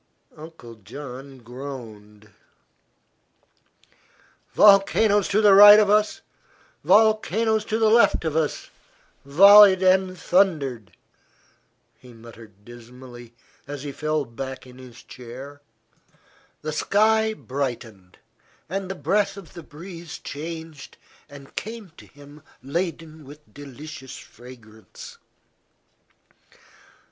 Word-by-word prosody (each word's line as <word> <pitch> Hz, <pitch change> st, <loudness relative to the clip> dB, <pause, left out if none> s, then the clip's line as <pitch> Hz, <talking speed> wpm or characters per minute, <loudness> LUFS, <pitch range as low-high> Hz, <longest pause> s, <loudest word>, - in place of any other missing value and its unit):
Uncle 155 Hz, -7 st, -13 dB
John 130 Hz, +4 st, -11 dB
groaned. 115 Hz, -5 st, -11 dB, 2.2 s
"Volcanoes 205 Hz, 0 st, +4 dB
to 210 Hz, +2 st, 0 dB
right 205 Hz, +1 st, +9 dB
of 205 Hz, -1 st, +2 dB
us, 210 Hz, 0 st, +1 dB, 0.6 s
volcanoes 220 Hz, +1 st, +2 dB
to 220 Hz, -, -2 dB
left 225 Hz, -4 st, +2 dB
of 155 Hz, -1 st, -3 dB
us 160 Hz, -2 st, -3 dB, 0.5 s
volleyed 195 Hz, +5 st, +6 dB
and 185 Hz, 0 st, +1 dB
thundered," 140 Hz, -, -1 dB, 1.0 s
he 125 Hz, -1 st, -16 dB
muttered 115 Hz, -3 st, -16 dB
dismally, 120 Hz, 0 st, -14 dB, 0.3 s
as 145 Hz, -1 st, -8 dB
he 145 Hz, -, -6 dB
fell 155 Hz, 0 st, -3 dB
back 130 Hz, +3 st, -9 dB
in 125 Hz, 0 st, -16 dB
his 125 Hz, -3 st, -15 dB
chair. 130 Hz, +4 st, -12 dB, 1.0 s
The 155 Hz, 0 st, -5 dB
sky 220 Hz, +5 st, +1 dB
brightened, 120 Hz, -, -7 dB, 0.5 s
and 190 Hz, +2 st, -5 dB
the 190 Hz, -, -5 dB
breath 195 Hz, +7 st, -1 dB
of 195 Hz, -5 st, -13 dB
the 175 Hz, -, -10 dB
breeze 165 Hz, +2 st, -11 dB
changed 160 Hz, -1 st, -9 dB, 0.3 s
and 140 Hz, -1 st, -15 dB
came 220 Hz, -4 st, -8 dB
to -, -, -16 dB
him 145 Hz, 0 st, -17 dB, 0.2 s
laden 160 Hz, +1 st, -5 dB
with 150 Hz, +2 st, -17 dB
delicious 145 Hz, -1 st, -11 dB
fragrance. 115 Hz, -3 st, -15 dB
150 Hz, 95 wpm, -22 LUFS, 125-190 Hz, 2.2 s, right